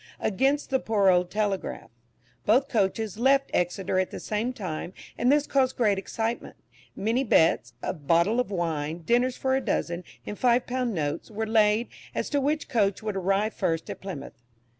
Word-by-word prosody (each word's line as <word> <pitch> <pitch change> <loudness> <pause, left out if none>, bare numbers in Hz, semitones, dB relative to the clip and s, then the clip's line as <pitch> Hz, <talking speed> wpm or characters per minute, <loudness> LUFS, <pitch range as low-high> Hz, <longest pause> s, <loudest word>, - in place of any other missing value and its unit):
against 270 +9 +1
the 265 - +3
poor 205 -5 +2
old 180 -1 +3
"Telegraph." 205 -1 -2 0.5
Both 255 +6 +3
coaches 215 -2 0
left 275 +2 +3
Exeter 185 +1 0
at 185 - 0
the - - -7
same 220 +4 -2
time, 185 -6 -5 0.2
and 245 +2 +2
this 295 0 +3
caused 260 -2 +1
great 210 -5 +2
excitement. 225 +4 -3 0.4
Many 230 +6 0
bets, 160 - +3
of 145 -5 -5
bottles 170 - +3
of 250 - 0
wine, 165 -3 -2
dinners 245 +6 +2
for 265 0 +1
a 265 - +1
dozen, 180 -6 -2 0.2
and 210 - -6
five 245 0 +3
pound 250 -3 -2
notes, 145 -2 -2
were 220 0 -3
laid, 220 +1 +3 0.3
as - - -2
to 285 -1 +2
which 300 +3 0
coach 205 -3 +1
would 210 -2 -3
arrive 195 +3 +1
first 165 -4 -1
at - - -9
Plymouth. 190 -8 -7
215 Hz, 175 wpm, -26 LUFS, 185-250 Hz, 0.5 s, the